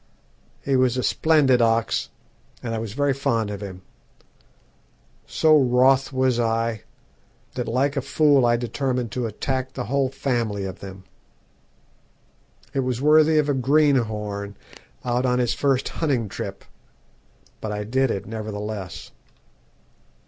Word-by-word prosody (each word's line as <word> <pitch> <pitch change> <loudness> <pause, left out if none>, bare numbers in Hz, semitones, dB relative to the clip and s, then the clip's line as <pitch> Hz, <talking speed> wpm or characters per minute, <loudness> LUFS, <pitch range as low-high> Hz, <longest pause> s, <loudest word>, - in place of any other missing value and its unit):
He 140 - +1
was 130 -1 +2
a 125 - -1
splendid 145 -6 +3
ox, 115 0 +1 0.5
and 115 -2 -3
I 115 - -2
was 110 -2 -5
very 145 +2 +1
fond 115 -6 -1
of 100 0 -6
him. 95 -2 -8 1.4
So 155 -1 +4
wroth 130 0 +4
was 130 -2 +1
I 115 -2 -1 0.7
that 125 -2 -4
like 135 +5 0
a 140 - 0
fool 145 -1 +3
I 120 0 +3
determined 125 0 -2
to 125 0 -2
attack 130 +4 -3
the - - -4
whole 135 +4 0
family 120 -7 -2
of 95 0 -7
them. 95 -1 -10 1.7
It 135 - -1
was 125 -2 -1
worthy 155 +2 +5
of 150 -1 +2
a 145 - +2
greenhorn 115 -8 +1 0.5
out 125 +1 0
on 125 0 +2
his 125 -2 +1
first 135 -2 +1
hunting 135 -9 -1
trip; 95 - -7 0.9
but 110 - -5
I 105 0 -3
did 130 +5 +1
it 100 - -3
nevertheless. 105 -3 -6
125 Hz, 135 wpm, -23 LUFS, 110-135 Hz, 1.7 s, worthy